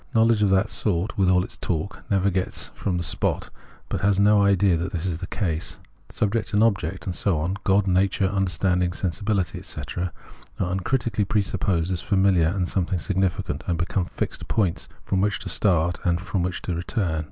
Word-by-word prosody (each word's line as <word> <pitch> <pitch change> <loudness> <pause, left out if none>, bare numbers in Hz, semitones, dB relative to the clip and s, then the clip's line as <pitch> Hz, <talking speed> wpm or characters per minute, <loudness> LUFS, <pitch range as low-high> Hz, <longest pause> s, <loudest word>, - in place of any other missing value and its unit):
Knowledge 115 -1 +4
of 105 - +4
that 95 +1 +2
sort, 95 -1 -1
with 95 -2 +2
all 90 -1 +4
its - - -7
talk, 90 +3 -3
never 100 0 +2
gets 95 0 -1
from 90 -3 -2
the 85 - -2
spot, 80 - -1 0.4
but - - -3
has 100 -1 +3
no 105 0 +5
idea 100 -2 +4
that 85 +3 -2
this 85 0 -2
is 85 -3 -2
the 90 - -5
case. 85 -5 -3 0.3
Subject 105 0 -1
and 105 - +5
object, 95 -5 0
and 95 - -2
so 90 -2 +2
on, 85 +6 -1
God, 100 -1 +3
nature, 95 +1 +2
imderstanding, 90 -2 +1
sensibility, 95 -1 -1
etc., 85 +5 -4 0.5
are 90 -2 0
uncritically 105 +3 0
presupposed 95 -4 0
as 90 - +1
familiar 95 -4 +3
and 90 +1 0
something 95 0 0
significant, 95 +1 -1
and 85 - 0
become 90 +2 -1
fixed - - -4
points 95 -6 0 0.2
from 95 - +1
which 105 +1 +1
to - - -5
start 90 -4 +2
and 85 -1 +2
to 95 +2 -4
which 90 0 -2
to 90 - -2
return. 85 -1 -1
95 Hz, 185 wpm, -24 LUFS, 90-100 Hz, 0.5 s, no